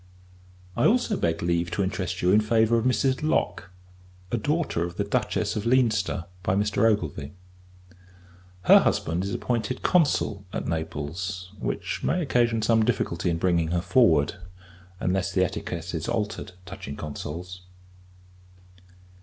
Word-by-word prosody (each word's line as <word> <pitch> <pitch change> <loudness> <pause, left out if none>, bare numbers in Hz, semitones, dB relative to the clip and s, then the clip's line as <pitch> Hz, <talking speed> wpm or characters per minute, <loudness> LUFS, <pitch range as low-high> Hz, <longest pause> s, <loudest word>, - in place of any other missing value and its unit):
I - - +4
also 235 -1 +2
beg 85 - -1
leave 85 0 0
to 100 - -1
interest 90 -2 -3
you 90 - +4
in 105 +2 +5
favour 110 +1 +3
of 115 0 +1
Mrs. 130 +1 +1
Lock; 155 - 0 0.6
a 120 - +1
daughter 145 - 0
of 85 0 -5
the - - +1
Duchess - - -1
of 105 +2 -2
Leinster, 110 -8 +2 0.2
by 95 0 0
Mr. 105 +2 +2
Ogilvie. 75 -6 -3 1.3
Her - - +8
husband 85 +3 0
is 100 - -3
appointed 120 +2 -2
Consul 145 - +2
at - - -4
Naples; 85 +4 -4
which - - -3
may 180 - +1
occasion 120 -7 +1
some 110 0 +4
difficulty 95 -6 0
in 85 - 0
bringing 85 -2 +1
her 85 +2 0
forward, 85 - +3 0.6
unless 95 +1 0
the 95 0 +2
etiquette 85 0 -5
is 80 -1 -3
altered 105 -4 -3
touching 90 -6 -7
Consuls. 85 +5 -6
95 Hz, 140 wpm, -26 LUFS, 85-115 Hz, 1.3 s, Her